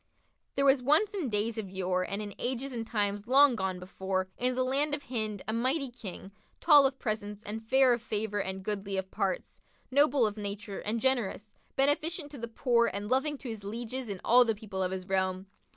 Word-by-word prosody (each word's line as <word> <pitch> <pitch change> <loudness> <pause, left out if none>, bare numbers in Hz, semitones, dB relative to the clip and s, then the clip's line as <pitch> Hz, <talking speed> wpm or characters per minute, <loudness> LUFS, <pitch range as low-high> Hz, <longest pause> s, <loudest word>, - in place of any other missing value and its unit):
[FN#55] - - -44
There 275 - +2
was 270 -1 +5
once 310 - +3
in 360 -10 -2
days 220 +2 0
of 200 -3 -5
yore 185 -1 -1
and 200 +3 -3
in 205 -1 -7
ages 260 +2 -1
and 230 -2 -4
times 205 -1 -1
long 270 0 +6
gone 190 -3 -2
before, 185 +1 -3
in 250 +1 0
the 255 - +1
land 285 +3 +1
of 290 - -10
Hind, 215 -5 -3
a 220 - -1
mighty 260 +4 0
King, 200 -4 -9 0.3
tall 295 -4 +7
of 265 0 -6
presence 215 -3 -4
and 220 +2 -5
fair 260 +2 +4
of 235 - -2
favour 210 -2 -2
and 190 0 -4
goodly 200 -1 -3
of 190 0 -3
parts, 190 -2 -2 0.3
noble 280 -2 +4
of 210 0 -2
nature 205 -1 -5
and 220 +3 -2
generous, 225 -4 0 0.2
beneficent 290 +3 +1
to 285 - -9
the 235 - -4
poor 235 0 +2
and 205 +2 -4
loving 280 +3 +1
to 265 - -9
his 220 -3 -6
lieges 235 +4 -4
and 195 -2 -4
all 245 +2 +7
the 225 -2 0
people 200 -2 -5
of 185 - +1
his 185 -1 -5
realm. 190 -1 0
225 Hz, 215 wpm, -30 LUFS, 200-260 Hz, 0.3 s, tall